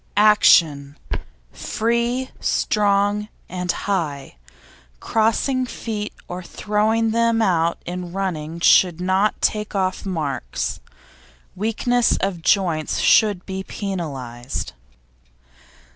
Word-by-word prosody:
ACTION 160 -9 +4 0.5
Free, 235 +3 -1
strong 205 0 +1 0.2
and 180 0 -2
high; 150 - -3 0.6
crossing 250 - +1
feet 215 -3 -5 0.2
or 180 +1 -6
throwing 215 +4 0
them 230 0 +2
out 170 -6 +2
in 180 0 -5
running 170 -4 -3
should 175 -1 +5
not 190 +3 +1
take 210 -1 -1
off 185 -1 -1
marks; 155 -9 -3 0.8
weakness 230 +4 +1
of 190 -4 -2
joints 165 -4 +1
should 205 -5 +3
be 190 0 -4
penalised. 140 - -5
195 Hz, 90 wpm, -21 LUFS, 170-215 Hz, 0.8 s, should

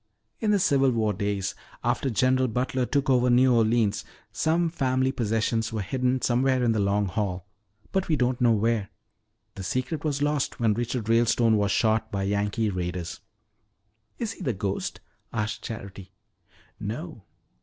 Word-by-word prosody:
In 220 - 0
the 210 - +4
Civil 140 -7 +3
War 110 -4 +1
days, 100 -1 -2 0.3
after 135 - 0
General 130 +2 +2
Butler 125 +2 -1
took 140 -2 0
over 125 -2 +3
New 125 +1 +5
Orleans, 110 -2 +2 0.3
some 165 +2 +1
family 130 -5 +1
possessions 115 -1 0
were 110 -3 -2
hidden 125 +4 0
somewhere 130 +1 +2
in 120 - +3
the 110 - +1
Long 100 +1 +2
Hall, 95 -2 -2 0.5
but 190 -1 0
we 160 - +2
don't 125 -1 0
know 120 -1 +5
where. 110 -1 +1 0.6
The - - -8
secret 130 - -2
was 145 -2 0
lost 145 -1 0
when 115 -3 +3
Richard 120 0 -2
Ralestone 115 0 +3
was 100 -1 +1
shot 110 0 +1
by 100 -1 -1
Yankee 105 +2 0
raiders." 90 -1 -4 1.0
"Is 230 -2 -2
he 225 - -11
the 130 -9 0
ghost?" 100 0 -3 0.3
asked 105 -2 -2
Charity. 100 -3 -8 0.7
"No. 120 - -5
115 Hz, 155 wpm, -26 LUFS, 105-130 Hz, 1.0 s, New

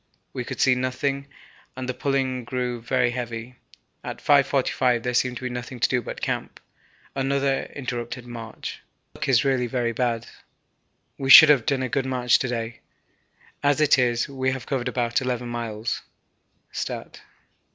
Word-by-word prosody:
We - - -3
could - - -7
see 130 - +5
nothing, 135 +2 -2 0.5
and 130 -1 -5
the 130 - -1
pulling 130 -2 -1
grew 125 -1 -3
very 125 +1 +1
heavy. 120 0 -5 0.5
At - - -5
5.45 130 -4 +2
there 125 - -1
seemed 125 0 +1
nothing 125 0 -5
to - - +4
do 125 - 0
but - - -7
camp - - -3 0.6
another 135 0 0
interrupted 120 -2 -5
march. 115 -2 -7 0.3
Our - - -14
luck - - -2
is 125 -1 +4
really 130 -2 +1
very 120 -1 -1
bad. 115 -1 -1 0.9
We 135 -1 -2
should 155 +3 +12
have 135 -6 +4
done 135 -2 +1
a - - 0
good 135 0 -1
march 125 -2 +3
to 130 - -1
day, 115 -1 -4 0.8
as 145 0 +2
it 150 -3 +5
is 120 -1 +1
we 130 -1 -1
have 135 - -6
covered 130 -3 -2
about 120 -1 0
11 125 -1 -2
miles 115 -2 -3 0.7
(stat.). - - -5
125 Hz, 160 wpm, -24 LUFS, 120-135 Hz, 0.9 s, should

